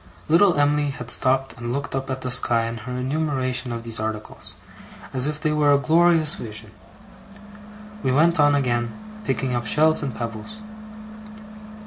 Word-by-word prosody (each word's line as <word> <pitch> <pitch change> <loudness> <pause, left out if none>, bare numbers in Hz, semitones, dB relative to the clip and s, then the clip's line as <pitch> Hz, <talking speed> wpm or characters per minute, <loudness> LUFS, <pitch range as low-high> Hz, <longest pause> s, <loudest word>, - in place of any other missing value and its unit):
Little 170 0 +4
Em'ly 145 0 +2
had 125 -3 -2
stopped 135 +1 +2
and 120 0 -5
looked 140 +3 -4
up 135 0 -3
at 130 0 -4
the 125 - -3
sky 115 -1 +1
in 115 0 -5
her 120 +3 -7
enumeration 130 -2 -2
of 115 -1 -5
these 115 -1 -1
articles, 110 0 -6 0.6
as 130 +1 +1
if 150 0 -3
they 155 - 0
were 150 -1 +3
a - - +5
glorious 160 +1 +4
vision. 105 -2 -8 1.3
We 130 - 0
went 160 +5 +3
on 145 0 +5
again, 120 -4 -1 0.3
picking 130 -1 -1
up 120 -2 -2
shells 155 +4 +4
and 135 -6 -4
pebbles. 115 - -6
130 Hz, 160 wpm, -22 LUFS, 120-150 Hz, 1.3 s, a